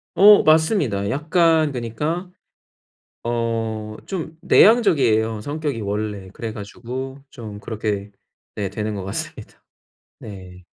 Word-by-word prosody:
어 205 +1 +8
맞습니다. 155 - +2
약간 160 - +2
그니까 150 +9 -3 0.9
어 115 -1 -1 0.3
좀 165 -4 -5
내향적이에요, 135 - +4
성격이 145 -1 -3
원래. 105 -1 -3
그래 115 -2 -5
가지고 125 +6 -7
좀 110 -4 -9
그렇게 105 -1 -3 0.4
네 100 -2 -2
되는 105 +2 -3
것 100 - -5
같습니다. 95 - -7 0.6
네. 95 -3 -11
115 Hz, 230 characters per minute, -21 LUFS, 105-155 Hz, 0.9 s, 어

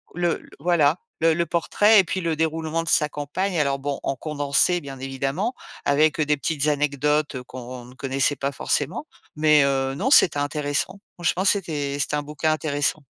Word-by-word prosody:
le 175 -1 -1
voilà, 160 -1 +3 0.2
le 165 0 +4
le 170 +1 0
portrait 205 +6 +4
et - - +5
puis 185 +1 -3
le 165 -2 -1
déroulement 160 +1 -1
de 165 - -4
sa 150 0 +3
campagne. 170 +7 -3
Alors 140 -1 +1
bon, 140 0 -3
en 135 - -1
condensé 150 +5 +1
bien 135 -2 -9
évidemment, 135 - -2 0.3
avec, 150 +2 +3
heu, 155 - +2
des 150 0 +1
petites 150 0 -1
anecdotes 150 0 0
heu 125 - -5
qu'on 125 -1 -9
ne 125 - -14
connaissait 135 +2 0
pas 140 +1 -2
forcément, 145 - -2 0.3
mais 150 -1 +5
heu, 135 -1 0
non, 265 - -1
c'était 155 - +6
intéressant. 145 +6 -2 0.2
Franchement 175 +2 -1
c'était 150 -8 0
c'était 150 - 0
un 145 - -2
bouquin 150 +2 -1
intéressant. 145 0 -1
150 Hz, 180 wpm, -23 LUFS, 140-165 Hz, 0.3 s, c'était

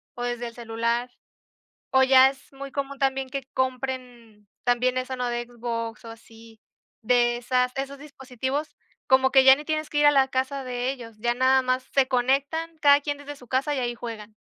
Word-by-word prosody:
o 245 - -5
desde 240 0 -3
el 235 - -9
celular, 235 +1 -2 0.8
o 265 0 +5
ya 265 0 +7
es 270 0 -13
muy 275 0 -8
común 280 0 -4
también 270 -1 0
que 275 0 -4
compren 250 -4 -4 0.2
también 250 +1 +1
eso, 255 +1 -3
¿no?, 250 -1 -2
de 240 0 -3
Xbox 230 -1 -5
o - - -8
así, 225 -1 -16 0.4
de 240 +1 +2
esas 250 +1 0
esos 275 +1 -4
dispositivos, 275 0 -5 0.3
como 265 0 +4
que 265 -1 +6
ya 265 0 +9
ni 295 - -8
tienes 310 0 -2
que 295 - -1
ir 295 - +4
a 290 - +8
la 270 -2 +4
casa 265 +1 -2
de 250 0 -2
ellos, 235 -4 -10
ya 240 +2 0
nada 260 +1 +3
más 255 0 0
se 270 -2 +3
conectan, 275 +6 0
cada 285 -1 +6
quien 290 0 -3
desde 290 0 -9
su 245 - -16
casa, 270 +4 0
y 275 - -2
ahí 240 -1 -2
juegan. 225 -3 -8
260 Hz, 200 wpm, -25 LUFS, 240-270 Hz, 0.8 s, ya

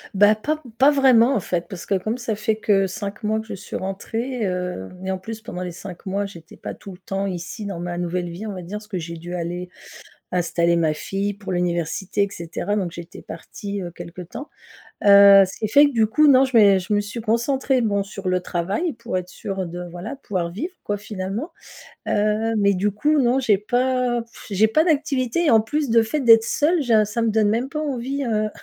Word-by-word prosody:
Bah 205 +2 +6
pas 300 +9 -2 0.2
pas 270 +2 +7
vraiment 265 -3 +5
en - - +2
fait, 175 -2 -3
parce 185 -2 -7
que - - -1
comme 215 +5 -2
ça 240 -3 -3
fait 215 +1 0
que 200 -3 +2
5 200 +3 -6
mois 215 +1 0
que 220 - -7
je 220 - -7
suis 195 - -8
rentrée, 225 +5 -3
heu 180 - -3 0.2
et 190 - -1
en 190 - -3
plus 220 +4 -7
pendant 180 -5 -7
les 180 -1 -4
5 180 +1 -10
mois, 200 +2 -1
j'étais 170 -4 -12
pas - - -6
tout 200 - -11
le - - -13
temps 195 +2 -3
ici 185 +3 -5
dans 195 -4 -5
ma 175 0 -4
nouvelle 175 0 -2
vie, 180 +6 -7
on 205 - -4
va 185 - -7
dire. 190 +5 -5
Parce 210 - -16
que 195 - -4
j'ai 170 0 -6
dû 175 +2 -7
aller 175 +1 -4 0.6
installer 170 -1 +1
ma 160 -2 +2
fille 195 +5 -3
pour 200 -2 -6
l'université 175 +2 -1
et 200 - +1
cetera, 175 +3 -3
donc 185 -5 -2
j'étais 170 0 -9
partie, 200 +4 -7
heu, 175 - -5
quelque 175 +1 -9
temps. 235 - -9 0.6
Heu, 200 -1 +9
ce 185 - -10
qui 215 - -1
fait 285 +7 +6
que 285 - -2
du 225 -3 +3
coup, 300 +7 +4
non, 265 -1 +7
je 260 -3 -1
mé 200 -3 +7
je 185 +3 -5
me 205 - +3
suis 205 +3 -6
concentrée, 250 +4 +1
bon 200 -3 0
sur 195 -1 -6
le 185 0 +1
travail 190 - -2
pour 185 -6 -4
être 180 - -6
sûre 190 0 -5
de 175 +1 -7
voilà, 180 +9 -6
pouvoir 185 -10 -3
vivre, 335 - -5
quoi, 205 - -1
finalement. 205 - -5 0.6
Heu, 215 +2 +1
mais 200 -1 +3
du 200 +3 +1
coup 295 +9 +1
non, 250 0 +3
j'ai 215 -5 +3
pas 245 +3 0
pff 230 +1 -15
j'ai 210 +2 +3
pas 310 +8 +3
d'activité 295 -1 +1
et - - +5
en 220 -1 +5
plus, 290 +5 -2
de 230 0 +5
fait 260 +7 -2
d'être 225 -3 +7
seule, 310 +7 +1
j'a 220 -5 +3
ça 225 +3 -2
me 230 - +2
donne 215 -1 +2
même 235 +5 0
pas 305 - -3
envie, 275 -1 -2
heu, 215 -2 0
205 Hz, 230 wpm, -22 LUFS, 185-235 Hz, 0.6 s, Heu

